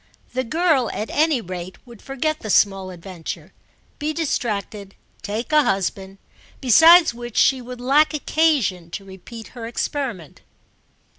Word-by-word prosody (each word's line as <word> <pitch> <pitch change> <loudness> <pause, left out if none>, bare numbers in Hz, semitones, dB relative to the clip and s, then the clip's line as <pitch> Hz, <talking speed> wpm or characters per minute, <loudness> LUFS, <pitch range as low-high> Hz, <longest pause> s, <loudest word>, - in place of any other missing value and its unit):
The 255 +1 -1
girl 310 -2 +1
at 215 - -4
any 305 -4 +2
rate 185 -1 -7
would 235 -3 -14
forget 305 +3 -2
the 215 - -7
small 195 -2 +2
adventure, 175 -1 -8 0.5
be 305 +1 -2
distracted, 210 -10 -3 0.3
take 220 +7 -4
a 305 0 +6
husband; 195 -3 -2 0.4
besides 320 - +7
which 240 -1 -8
she 265 -2 +4
would 250 0 -9
lack 280 +5 +3
occasion 285 - 0
to 195 +3 -7
repeat 195 +4 -11
her 235 -2 -8
experiment. 235 - -4
235 Hz, 135 wpm, -21 LUFS, 195-290 Hz, 0.5 s, besides